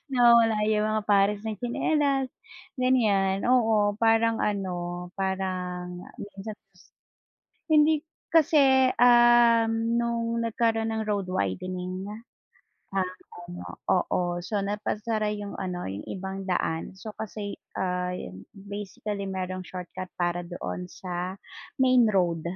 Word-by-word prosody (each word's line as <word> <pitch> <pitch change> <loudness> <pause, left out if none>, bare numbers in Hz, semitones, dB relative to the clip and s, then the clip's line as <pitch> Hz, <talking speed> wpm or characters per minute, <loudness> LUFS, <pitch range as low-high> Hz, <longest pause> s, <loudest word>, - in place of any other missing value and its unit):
nawawala 235 -3 +5
'yung 215 0 +2
mga 215 0 0
pares 205 0 +3
ng 220 -1 -3
tsinelas, 270 +2 +1 0.5
ganiyan. 205 -7 +2
Oo, 220 -5 +4
parang 225 0 +3
ano, 180 -3 -2
parang 180 -2 -3 0.2
minsan 205 +1 -7 1.2
Hindi 305 0 +5 0.3
kasi, 315 -2 +5 0.3
uhm, 240 -2 +6 0.3
no'ng 235 0 -1
nagkaro'n 225 0 +1
ng 220 0 -1
road 200 -3 0
widening 185 - -3
nga, 210 - -6 0.9
ah, 185 - -6 0.3
ano, 175 0 -8 0.2
oo, 180 0 +2 0.2
so 205 +3 -2
napasara 210 +2 -1
'yung 205 -1 -5
ano 180 -2 -4
'yung 100 +2 -5
ibang 190 0 -5
daan 180 -3 -2
so 215 +2 -8
kasi, 210 -1 -5 0.2
ah, 180 -1 -1
'yun, 95 - -7
basically 200 0 -6
merong 185 0 -3
shortcut 180 0 -7
para 175 0 0
doon 90 - -5
sa 180 +1 -5 0.4
main 255 -2 +5
road. 175 -5 +1
205 Hz, 115 wpm, -27 LUFS, 185-225 Hz, 1.2 s, uhm